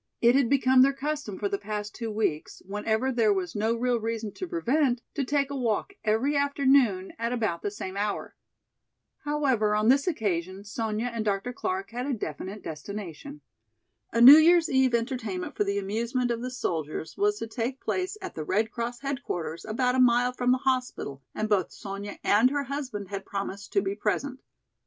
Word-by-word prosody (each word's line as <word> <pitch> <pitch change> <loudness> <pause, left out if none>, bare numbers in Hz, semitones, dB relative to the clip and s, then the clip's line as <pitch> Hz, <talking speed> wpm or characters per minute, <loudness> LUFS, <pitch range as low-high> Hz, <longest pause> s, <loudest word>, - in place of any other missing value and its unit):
It 235 +1 +5
had 265 -3 +3
become 260 -2 +5
their 275 +1 +5
custom 280 -7 -4
for 205 - -1
the 200 0 -2
past 210 0 -5
two 230 -2 -5
weeks, 210 -8 -2
whenever 220 +6 -1
there 230 -4 +3
was 185 -3 -1
no 220 +2 +1
real 245 0 +1
reason 225 -1 -3
to 370 - -5
prevent, 285 -7 +1
to 285 - -1
take 280 +1 0
a - - -3
walk 245 - -1
every 230 +7 +1
afternoon 270 -9 +2
at 230 +1 -1
about 215 -9 -1
the - - -1
same 195 -2 -6
hour. 205 +1 -3 0.9
However, 265 -8 +1
on 215 +2 +2
this 275 +4 +4
afternoon, 195 - -2
Sonya 215 +2 -3
and 230 -2 -2
Dr. 205 +3 -1
Clark 195 -2 -3
had 245 +3 -3
a 275 - 0
definite 190 +2 -6
destination. 200 - -7 0.7
A - - 0
New 270 +5 +12
Year's 335 +1 +5
eve 265 -2 +3
entertainment 230 -6 -3
for 210 - +1
the 200 0 -1
amusement 235 +5 -1
of 235 0 -2
the 250 - -3
soldiers 160 - -3
was 415 +1 +1
to - - -4
take 235 +4 -3
place 375 +3 -2
at 375 - -6
the 155 - -5
Red 215 +7 0
Cross 240 +1 -4
headquarters 245 - -4
about 250 +3 0
a 260 - +1
mile 245 0 +4
from 250 0 +1
the 255 - +4
hospital 255 - -2
and 215 - -1
both 205 -3 +1
Sonya 200 +1 -7
and 220 +5 +5
her 285 +1 -1
husband 255 -8 -5
had 195 -1 -4
promised 200 0 -5
to 200 - +3
be 195 0 -1
present. 255 +6 -2
230 Hz, 190 wpm, -27 LUFS, 205-265 Hz, 0.9 s, New